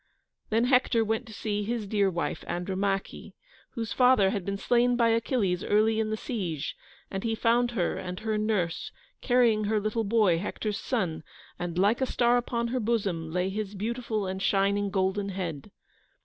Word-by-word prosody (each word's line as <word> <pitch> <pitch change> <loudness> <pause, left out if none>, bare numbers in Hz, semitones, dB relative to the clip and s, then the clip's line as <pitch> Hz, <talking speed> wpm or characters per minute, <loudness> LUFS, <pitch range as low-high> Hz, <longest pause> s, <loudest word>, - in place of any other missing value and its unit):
Then 225 +1 +2
Hector 250 -2 +3
went 225 +3 -1
to - - -10
see 210 0 -2
his 225 +1 -2
dear 200 -1 +2
wife, 175 -2 -3
Andromache, 195 +2 -2 0.4
whose 225 -3 -3
father 250 -7 +5
had 200 -3 -2
been 200 +2 -3
slain 245 +3 +2
by 235 -1 +3
Achilles 225 -5 +1
early 215 +1 +2
in 220 -1 0
the 215 - -1
siege, 180 - -3 0.4
and 195 0 -3
he 225 -1 0
found 235 +2 +2
her 175 - 0
and 180 +2 -6
her 220 -1 -1
nurse 210 -6 -1 0.3
carrying 235 -4 +3
her 215 +1 +1
little 215 +2 -1
boy, 200 -5 +3
Hector's 210 +2 -3
son, 180 -11 -2 0.4
and 175 -1 -4
like 205 +7 +3
a 260 - +2
star 240 0 +3
upon 235 -1 -1
her 255 +1 -1
bosom 200 -8 -1
lay 180 +2 0
his 210 0 -4
beautiful 220 0 -2
and 190 0 -4
shining 200 +1 +2
golden 195 +1 0
head. 175 -7 -5
210 Hz, 175 wpm, -28 LUFS, 190-230 Hz, 0.4 s, father